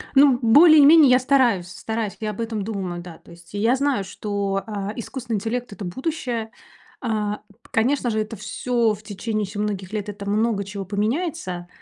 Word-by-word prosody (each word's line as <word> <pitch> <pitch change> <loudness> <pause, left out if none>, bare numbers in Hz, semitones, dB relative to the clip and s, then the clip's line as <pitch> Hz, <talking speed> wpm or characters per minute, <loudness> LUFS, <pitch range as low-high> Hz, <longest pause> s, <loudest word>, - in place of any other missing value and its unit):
Ну, 270 -2 +6
более-менее 300 +4 +7
я 250 - +6
стараюсь 245 -9 +2
стараюсь, 220 +2 -4
я 215 -1 -2
об 210 - -6
этом 225 -3 -3
думаю, 190 -5 -4
да. 175 -2 -10
То - - -19
есть 170 +1 -16
и - - -2
я 230 +4 +3
знаю, 270 -6 0
что, 200 -1 -3
а, 205 -1 -4
искусственный 235 -1 -5
интеллект- 235 +4 -3
это 200 -2 -7
будущее. 240 - -3 0.5
А 210 -4 -1
п 215 +3 -24
конечно 250 +3 +1
же, 220 -1 0
это 215 +1 -3
всё 230 +2 0
в 210 +1 -10
течение 215 +1 -3
ещё 205 +1 -6
многих 205 -1 -3
лет, 210 -1 -3
это 200 0 -7
много 215 -1 +1
чего 195 0 -6
поменяется. 210 - -2
215 Hz, 185 wpm, -23 LUFS, 200-245 Hz, 0.5 s, более-менее